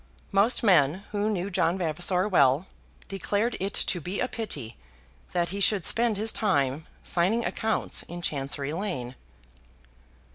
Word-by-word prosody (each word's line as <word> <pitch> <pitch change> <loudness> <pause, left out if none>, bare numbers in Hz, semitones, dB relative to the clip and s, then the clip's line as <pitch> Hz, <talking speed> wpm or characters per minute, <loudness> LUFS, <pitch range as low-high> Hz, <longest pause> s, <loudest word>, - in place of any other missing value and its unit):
Most 205 +6 +3
men 175 -3 +4
who 210 +1 0
knew 200 -1 -2
John 180 -1 +1
Vavasor 180 +3 0
well, 145 -4 +3 0.4
declared 205 +4 -1
it 195 +1 -3
to 175 - 0
be 180 +5 -4
a 250 - 0
pity 150 - -4 0.6
that 175 -1 0
he 200 +3 -4
should 200 -2 +3
spend 230 -2 +3
his 220 +2 +3
time 140 - +1
in 155 +3 -10 0.2
signing 195 +7 +1
accounts 220 -1 0
in 175 0 -8
Chancery 140 -1 -2
Lane. 165 -10 -4
185 Hz, 145 wpm, -27 LUFS, 155-205 Hz, 0.6 s, men